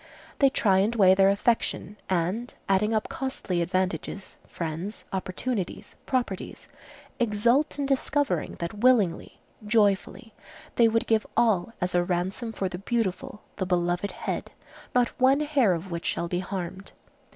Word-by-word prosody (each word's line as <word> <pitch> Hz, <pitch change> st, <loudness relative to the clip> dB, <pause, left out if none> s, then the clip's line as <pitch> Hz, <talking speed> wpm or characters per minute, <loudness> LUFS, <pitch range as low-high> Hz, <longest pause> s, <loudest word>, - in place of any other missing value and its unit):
They 275 Hz, -, +6 dB
try 195 Hz, -7 st, +3 dB
and 215 Hz, +5 st, +1 dB
weigh 190 Hz, -4 st, +6 dB
their 195 Hz, 0 st, +5 dB
affection, 210 Hz, 0 st, 0 dB
and 190 Hz, +7 st, -1 dB
adding 195 Hz, +3 st, +2 dB
up 220 Hz, -1 st, 0 dB
costly 215 Hz, -9 st, -3 dB
advantages, 185 Hz, +1 st, -2 dB
friends, 170 Hz, +5 st, -5 dB
opportunities, 190 Hz, +2 st, -3 dB
properties, 245 Hz, -8 st, -3 dB, 0.5 s
exult 240 Hz, +6 st, +2 dB
in 285 Hz, -, -1 dB
discovering 270 Hz, -, 0 dB
that 170 Hz, +5 st, -5 dB
willingly, 225 Hz, -8 st, +2 dB, 0.2 s
joyfully, 210 Hz, +1 st, +1 dB, 0.4 s
they 235 Hz, -, +6 dB
would 225 Hz, 0 st, +1 dB
give 220 Hz, -1 st, +1 dB
all 225 Hz, -1 st, +2 dB
as 180 Hz, 0 st, -1 dB
a 175 Hz, 0 st, +3 dB
ransom 185 Hz, +6 st, -2 dB
for 195 Hz, -3 st, -2 dB
the 180 Hz, -1 st, -6 dB
beautiful, 210 Hz, -2 st, -2 dB
the 190 Hz, -, -1 dB
beloved 175 Hz, +1 st, 0 dB
head, -, -, -4 dB, 0.5 s
not 245 Hz, -1 st, +4 dB
one 270 Hz, +3 st, +5 dB
hair 290 Hz, -8 st, +3 dB
of 175 Hz, +2 st, -5 dB
which 170 Hz, 0 st, -4 dB
shall 170 Hz, -, -1 dB
be 175 Hz, +1 st, -1 dB
harmed. 190 Hz, 0 st, -6 dB
200 Hz, 140 wpm, -26 LUFS, 180-235 Hz, 0.5 s, They